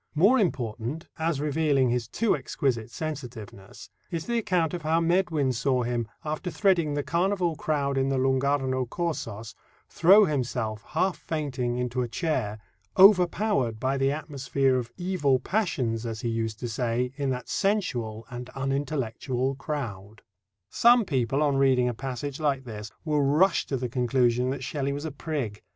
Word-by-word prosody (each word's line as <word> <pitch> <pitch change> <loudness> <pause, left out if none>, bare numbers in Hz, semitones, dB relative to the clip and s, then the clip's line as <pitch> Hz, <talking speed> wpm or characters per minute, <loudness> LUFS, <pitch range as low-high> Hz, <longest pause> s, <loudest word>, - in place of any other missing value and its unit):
More 205 +12 +5
important, 130 - -2
as 160 -3 0
revealing 145 -3 +2
his 120 -2 -1
too 230 - +1
exquisite 130 -5 -2
sensitiveness, 120 -8 -7 0.2
is 165 -3 -4
the 235 0 0
account 180 -7 0
of 175 - -3
how 160 +1 +2
Medwin 165 -5 +1
saw 125 +1 +1
him, 120 -1 -2 0.2
"after 155 +4 -3
threading 175 -6 +2
the 145 - -1
carnival 175 0 0
crowd 140 -3 -1
in 135 0 +1
the 135 - 0
Lung' 130 0 +2
Arno 130 -2 0
Corsos, 115 - -4 0.4
throw 195 +5 +6
himself, 125 - -2
half 170 - -1
fainting, 130 -6 -2
into 125 0 -1
a 120 - -1
chair, 120 -6 -2 0.4
overpowered 180 - +4
by 130 +3 0
the 135 0 +2
atmosphere 140 -3 0
of 120 -1 -4
evil 175 -7 +1
passions, 130 - -1
as 115 -2 -4
he 120 - -1
used 115 -1 -2
to 120 - -2
say, 120 +2 -1
in 140 -1 -1
that 125 -1 -3
sensual 120 - -1
and 125 0 -7
unintellectual 135 -2 -1
crowd." 115 -8 -6 0.5
Some 240 -1 +5
people, 135 -1 0
on 140 -2 +2
reading 130 -2 +3
a 120 - 0
passage 135 +3 -5
like 140 -3 0
this, 110 -3 -7 0.2
will 150 -1 +1
rush 155 +7 +3
to 135 - -1
the 125 0 -2
conclusion 125 0 +1
that 130 0 -3
Shelley 140 +1 -2
was 145 +2 -5
a 160 - -3
prig. 135 -8 -4
135 Hz, 160 wpm, -27 LUFS, 120-160 Hz, 0.5 s, throw